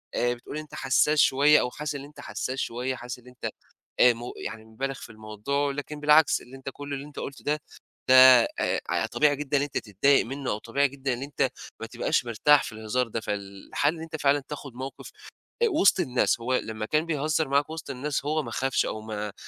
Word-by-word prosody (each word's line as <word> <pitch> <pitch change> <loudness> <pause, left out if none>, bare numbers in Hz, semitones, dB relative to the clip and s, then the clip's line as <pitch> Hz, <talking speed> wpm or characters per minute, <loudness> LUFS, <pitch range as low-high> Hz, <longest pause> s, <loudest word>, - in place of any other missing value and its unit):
آآ 120 0 +1
بتقول 125 +5 -8
أنت 155 -1 -8
حسّاس 145 +3 +2
شوية 145 +3 +5
أو 125 - -1
حاسس 150 -1 -4
اللي 140 0 -7
أنت 150 - -16
حسّاس 130 +1 -4
شوية، 125 +2 -2
حاسس 125 +1 -7
اللي 125 +1 -16
أنت 125 - -5 0.5
آآ 125 0 +7
م 115 - -11 0.2
يعني 110 -1 -6
مُبالغ 135 +5 -4
في - - -11
الموضوع، 110 +7 -2
لكن 145 +1 -6
بالعكس 150 +1 +5
اللي 130 +2 -12
أنت 135 0 -6
كل 145 0 -7
اللي 140 +1 -5
أنت 150 - -10
قُلته 140 - -7
ده، 150 +1 -1 0.5
ده 130 - +8 0.4
آآ - - 0
اع - - +1
طبيعي 150 -1 +2
جدًا 145 0 -1
اللي 140 - +1
أنت 145 - -5
تتضايق 115 +7 +2
منّه 135 +2 -5
أو 105 - -1
طبيعي 140 +6 +1
جدًا 135 -1 -3
اللي 125 +3 -4
أنت 140 -2 0 0.3
ما 115 - -4
تبقاش 120 +1 0
مرتاح 130 +6 +4
في - - -6
الهزار 110 +3 -2
ده، 115 - -3
فالحل 100 +9 -2
اللي 160 -1 -8
أنت 160 0 -7
فعلًا 140 0 +3
تاخُد 140 -3 -7
موقِف 130 +2 -8 0.5
آآ 465 - +5
وِسط 255 - +4
الناس، 130 -7 +1
هو 125 +2 0
لمّا 110 -2 -3
كان 155 +6 +1
بيهزّر 155 -1 0
معاك 140 +2 +1
وِسط 160 -2 -7
الناس 140 +2 -3
هو 155 +1 0
ما - - -7
خافش 135 0 0
أو 110 - -4
ما 105 -1 -5
135 Hz, 215 wpm, -26 LUFS, 120-145 Hz, 0.5 s, ده